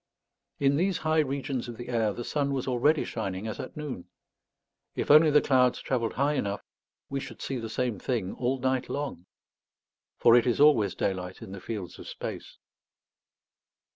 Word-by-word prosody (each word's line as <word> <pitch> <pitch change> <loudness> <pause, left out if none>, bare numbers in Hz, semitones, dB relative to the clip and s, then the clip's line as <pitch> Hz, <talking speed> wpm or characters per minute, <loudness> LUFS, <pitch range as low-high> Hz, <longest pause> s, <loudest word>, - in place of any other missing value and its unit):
In 140 0 +3
these 185 +2 +1
high 155 0 +1
regions 135 -3 -1
of 115 - -7
the 120 0 -8
air 115 -3 +1
the 120 - -5
sun 140 +2 -1
was 130 - -3
already 140 +5 +3
shining 95 -3 -4
as 110 - -5
at - - -7
noon. 145 -12 -5 0.9
If - - 0
only 155 +1 +8
the 150 0 +5
clouds 125 -2 +3
travelled 120 -4 -1
high 140 +3 +1
enough, 100 -7 -2 0.4
we 140 - -3
should 135 - -9
see 135 - -3
the 115 -1 -5
same 115 -2 -1
thing 110 -7 -2
all 130 +2 -1
night 130 0 -1
long. 140 -11 -4 0.9
For 115 - +6
it 120 0 +4
is 120 - +1
always 130 -10 +5
daylight 90 -1 -3
in - - -9
the 100 -1 -8
fields 100 -6 -6
of - - -10
space. - - -7
125 Hz, 175 wpm, -28 LUFS, 110-140 Hz, 0.9 s, only